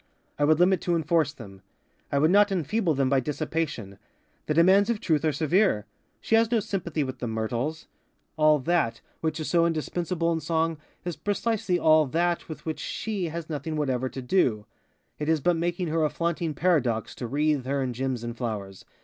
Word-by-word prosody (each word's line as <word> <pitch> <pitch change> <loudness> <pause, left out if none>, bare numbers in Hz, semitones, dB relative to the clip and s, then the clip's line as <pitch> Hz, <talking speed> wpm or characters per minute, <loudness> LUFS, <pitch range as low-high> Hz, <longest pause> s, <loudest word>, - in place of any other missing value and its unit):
I 145 - +4
would 155 +1 +4
limit 185 +1 +4
to 175 - 0
enforce 160 -2 +1
them. 100 -9 -12 0.5
I 140 - +1
would 155 +4 +4
not 205 +1 +5
enfeeble 180 0 0
them 135 -1 +1
by 135 0 +3
dissipation. 145 -8 -3 0.5
The 150 - 0
demands 190 +6 +5
of 235 -3 0
Truth 155 -6 +1
are 155 - +2
severe. 160 - +2 0.3
She - - -3
has 225 0 +5
no 235 - +3
sympathy 175 -7 -2
with 130 -1 -6
the 120 - -3
myrtles. 115 +8 -3 0.5
All 155 -1 +4
_that 130 -7 0 0.2
_which 160 0 -1
is 155 - -3
so 170 -1 +3
indispensable 170 +1 -1
in 165 - -1
Song 160 0 -1 0.3
is 175 -2 -3
precisely 205 -2 -1
all 155 -2 +4
_that 170 +3 0
_with 155 - -8
which 160 -1 -4
_she 195 -7 -3
_has 165 0 -5
nothing 155 0 -4
whatever 130 -4 -1
to 130 - -7
do. 125 - +1 0.5
It 150 +1 -2
is 160 -1 +3
but 175 +5 +2
making 175 +1 -1
her 160 0 +1
a 155 - +2
flaunting 170 -2 -2
paradox 135 -11 +1
to 120 - -6
wreathe 145 0 0
her 140 0 0
in 125 -1 -2
gems 130 -1 -3
and 120 0 -5
flowers. 105 -6 -5
155 Hz, 190 wpm, -26 LUFS, 135-175 Hz, 0.5 s, not